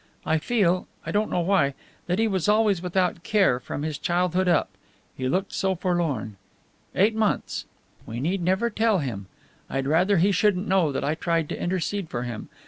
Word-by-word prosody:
I 160 0 +2
feel 185 -2 +1 0.2
I - - -3
don't 210 +1 +1
know 175 - 0
why 170 -7 +2 0.3
that 180 +1 0
he 225 +1 +2
was 190 -2 0
always 210 -4 +3
without 180 -1 0
care, 195 - +2
from 140 +3 -5
his 155 -2 -3
childhood 180 +1 +1
up. 175 - +2 0.4
He 130 -1 -2
looked 190 +7 -1
so 190 -1 0
forlorn! 160 - -1 0.6
Eight 205 +4 +4
months! 220 -1 -1 0.4
We 115 +2 -5
need 175 +8 -1
never 190 +7 +1
tell 220 -1 +2
him. 115 - -4 0.4
I'd 135 0 -2
rather 180 +7 +3
he 190 +5 +4
shouldn't 200 0 +2
know 185 -5 +3
that 135 - -2
I 145 - +1
tried 165 -1 -1
to - - -5
intercede 185 +1 -2
for 120 -1 -3
him. 120 -3 -6
180 Hz, 185 wpm, -25 LUFS, 155-195 Hz, 0.6 s, Eight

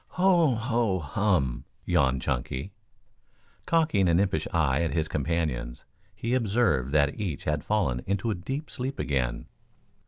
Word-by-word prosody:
"Ho 175 -7 +4
ho 115 -4 0
hum!" 80 - 0 0.2
yawned 65 -2 +2
Chunky. 65 +6 -3 1.0
Cocking 155 - +3
an 85 +1 +4
impish 95 -6 0
eye 75 -5 +2
at 80 -4 -1
his 80 -1 +1
companions, 70 -6 -2 0.3
he 115 +2 -2
observed 105 - +1
that 75 +5 +2
each 85 -9 -3
had 75 -1 -1
fallen 85 -13 0
into 100 +3 0
a - - +1
deep 135 - -5
sleep 130 +2 -4
again. 65 -4 -1
85 Hz, 135 wpm, -27 LUFS, 70-115 Hz, 1.0 s, Ho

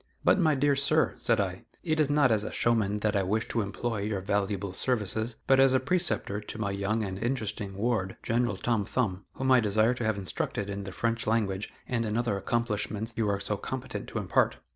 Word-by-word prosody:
"But, - - +4
my 155 -4 +4
dear 140 +1 +3
sir," 155 +3 +2
said 115 -2 +2
I, 95 -2 -2 0.2
"it 155 -2 0
is 150 -2 +3
not 145 -3 +4
as 105 -2 +2
a - - -4
showman 105 -3 +1
that 105 0 +1
I 100 - +3
wish 105 +4 0
to 115 - 0
employ 110 +2 -3
your 105 -1 -1
valuable 100 0 -1
services, 110 0 -1
but 135 0 +4
as 135 -1 +6
a - - +5
preceptor 140 - 0
to 105 - -7
my 100 -2 -1
young 100 +3 -1
and 95 -1 -4
interesting 110 -5 -2
ward, 100 -3 -1
General 120 +1 0
Tom 115 -4 0
Thumb, 100 -4 -2
whom 130 0 0
I 130 - +7
desire 110 +2 +3
to 120 - -4
have 110 -2 +1
instructed 100 +1 -3
in 100 0 -5
the 95 - -6
French 115 +6 -1
language 105 -3 0 0.2
and 120 -3 0
in 110 0 -1
other 120 -4 0
accomplishments 110 0 -1
you 110 -2 0
are 100 0 0
so 100 +1 -2
competent 130 +5 -5
to - - -5
impart. - - +1
110 Hz, 215 wpm, -29 LUFS, 100-120 Hz, 0.2 s, I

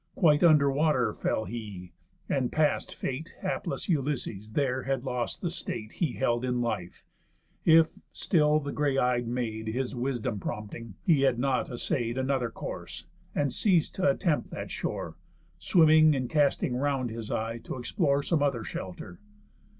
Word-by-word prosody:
Quite 150 -5 +4
under 150 -4 +6
water 135 -6 +2
fell 110 - -1
he; 105 -6 -7 0.4
and, 130 -3 0
past 155 -1 +1
fate, 155 +7 -5
Hapless 185 -2 -3
Ulysses 130 - -2
there 130 -1 +1
had 135 -1 -2
lost 125 +1 -3
the 175 - 0
state 110 -10 -5
He 160 -8 -1
held 120 -2 0
in 125 -1 0
life, 110 -7 -3 0.6
if, 160 -1 +6 0.2
still 150 -3 +2
the 145 -1 -5
grey 140 -2 0
eyed 125 -2 +1
Maid 115 -2 -3
His 125 +3 -2
wisdom 120 -4 -2
prompting, 105 +1 -6
he 155 -6 +4
had 135 -3 +3
not 130 0 0
assay'd 120 0 -2
Another 130 -2 0
course, - - -7 0.3
and 145 -2 +1
ceas'd 180 -7 +2
t' - - -5
attempt 185 -4 +1
that - - -6
shore, - - -4 0.4
Swimming, 155 -3 +5
and 130 -2 -3
casting 145 -4 +2
round 135 -2 0
his 115 -1 -6
eye 115 +1 -2
t' - - -6
explore 140 - 0
Some 160 -1 +1
other 135 -6 +1
shelter. 90 -3 -7
130 Hz, 155 wpm, -28 LUFS, 120-150 Hz, 0.6 s, under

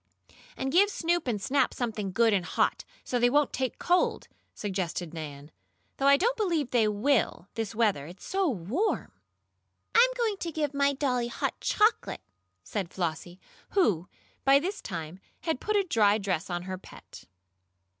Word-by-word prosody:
"And 265 0 -2
give 390 +6 +5
Snoop 345 -5 0
and 225 -4 0
Snap 270 +8 +1
something 215 -5 -3
good 225 +2 +3
and 190 -3 +2
hot, - - 0 0.2
so 245 - -1
they 245 0 +4
won't 290 +2 +2
take 260 -1 -2
cold," 355 +1 +1 0.3
suggested 180 -4 -3
Nan. 150 -2 -8 0.5
"Though 275 - +2
I 280 0 +7
don't 470 - +1
believe 335 - 0
they 230 -3 +3
will 210 -3 +1
this 225 -1 -4
weather, 205 -11 +1
it's 175 +3 -12
so 385 -2 +1
warm." 250 - -1 0.8
"I'm 480 +2 +6
going 450 -4 0
to 340 -3 -4
give 295 -2 -2
my 280 0 +2
dollie 255 -4 0
hot 240 - -3
chocolate," 430 +2 +1 0.4
said 180 - -3
Flossie, 175 0 -4 0.3
who, 195 - +2 0.3
by 275 0 +6
this 370 +8 -2
time, 170 -2 -6 0.2
had 320 -6 -2
put 425 - -1
a 405 - +4
dry 215 - +3
dress 190 -6 -2
on 175 0 -3
her 185 0 -5
pet. - - -13
240 Hz, 165 wpm, -28 LUFS, 190-315 Hz, 0.8 s, I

